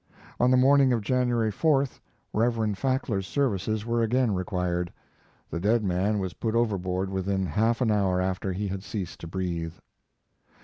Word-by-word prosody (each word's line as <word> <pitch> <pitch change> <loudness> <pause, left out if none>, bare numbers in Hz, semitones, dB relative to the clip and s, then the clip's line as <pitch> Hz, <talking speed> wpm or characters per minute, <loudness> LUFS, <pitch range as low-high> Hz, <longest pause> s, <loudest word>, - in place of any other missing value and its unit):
On 125 - +4
the 130 - +5
morning 135 +1 +5
of 115 - 0
January 120 -2 +1
4th 140 +2 +1 0.3
Reverend 110 -2 +1
Fackler's 125 -8 -1
services 110 -5 0
were 115 0 +1
again 120 0 +2
required. 90 -2 -1 0.6
The 85 - -2
dead 110 +5 +2
man 95 +3 +1
was 95 -3 -3
put 110 -1 -2
overboard 95 -4 0
within 95 0 -1
half 110 - +1
an 115 -3 +3
hour 95 -3 +2
after 95 +1 -1
he 100 +3 -2
had 95 0 -4
ceased 95 -3 -5
to 85 - -8
breathe. 85 -2 -3
105 Hz, 160 wpm, -27 LUFS, 95-120 Hz, 0.6 s, the